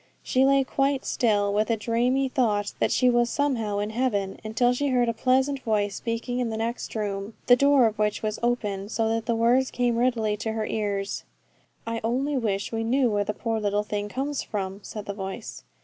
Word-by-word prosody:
She 260 +1 +2
lay 275 0 +4
quite 275 +1 0
still, 205 -4 +1
with 215 +2 +1
a 230 - +2
dreamy 245 +5 +1
thought 215 -6 0
that - - +2
she 255 - +3
was 240 -1 +3
somehow 230 -8 0
in 205 +1 -2
heaven, 215 -5 -1
until 235 +3 +2
she 285 +3 -1
heard 250 -3 +2
a 230 - +1
pleasant 260 +4 +1
voice 210 -5 0
speaking 235 +3 -3
in 245 -2 0
the 220 - -3
next 230 +2 -3
room, 205 0 -3
the 245 - +7
door 280 -1 +5
of 220 -1 -1
which 210 0 0
was 215 -1 -2
open, 210 -5 -1
so 225 0 0
that 225 0 -1
the 235 - +2
words 245 +3 +3
came 245 -2 0
readily 230 -4 +1
to 220 +1 -3
her 220 -1 -2
ears. 200 -2 -2 0.6
'I 230 0 -3
only 265 +6 0
wish 205 -6 -1
we 225 0 -2
knew 250 +1 +2
where 205 -1 +1
the 205 - -2
poor 225 -2 -2
little 205 0 0
thing 205 0 -3
comes 275 +5 -2
from,' 195 -2 -4
said 210 0 -7
the 200 - -4
voice. 195 -1 -6
230 Hz, 210 wpm, -26 LUFS, 210-250 Hz, 0.6 s, the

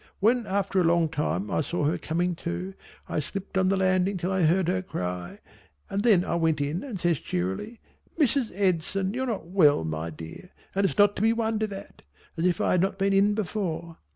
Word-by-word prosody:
When 230 +2 +2
after 195 -1 +1
a - - +3
long 165 -1 +3
time 105 - -2
I - - +1
saw 155 0 -1
her 155 - +1
coming 175 +3 -1
to, 90 - -4 0.3
I - - -1
slipped 195 +6 -6
on 190 0 +3
the 195 - +2
landing 185 +1 +2
till 180 +2 -2
I 190 -1 +1
heard 170 +2 +3
her 185 +1 +1
cry, 90 - -5 0.5
and 200 - 0
then 205 -6 +4
I - - -2
went 160 -2 +1
in 145 +5 -1
and 240 -9 -6
says 170 -3 +1
cheerily 95 - -3 0.4
"Mrs. 275 -5 +2
Edson 190 +1 0
you're 260 +2 -2
not 220 -8 -3
well 165 - +4
my 80 +1 -3
dear 80 - -10 0.2
and 195 +1 +2
it's - - -5
not 205 0 +5
to - - -2
be 225 +1 +4
wondered 220 -2 -1
at," 195 0 -9 0.3
as 165 - -1
if 175 -2 0
I - - +2
had 180 - +3
not 195 +1 0
been 195 0 +1
in 200 +1 +4
before. 175 -5 -3
185 Hz, 210 wpm, -27 LUFS, 160-200 Hz, 0.5 s, not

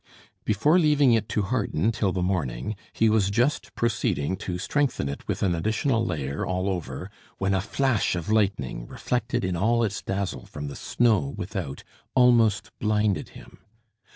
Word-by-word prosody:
Before 145 - +3
leaving 145 -6 +4
it 110 -2 +1
to 105 - 0
harden 105 -3 0
till 105 -3 0
the 90 -1 -1
morning, 80 - -1 0.2
he 115 - +2
was 105 -3 +3
just 120 +8 0
proceeding 105 - 0
to 90 -1 -4
strengthen 130 - 0
it 70 - -6
with - - -2
an 95 -3 +2
additional 110 - +1
layer 70 -8 -2
all 95 +1 -1
over, 90 0 -4 0.3
when 95 0 0
a 95 - +2
flash 115 -1 +1
of 85 -2 -4
lightning, 95 - 0
reflected 120 -3 -2
in 90 -1 -1
all 115 +6 +2
its 100 -3 -2
dazzle 100 -1 -3
from 75 -1 -6
the 70 - -8
snow 120 +3 +1
without, 90 -6 -5 0.3
almost 120 -5 +4
blinded 105 -2 +1
him. - - -15
100 Hz, 160 wpm, -26 LUFS, 90-115 Hz, 0.3 s, leaving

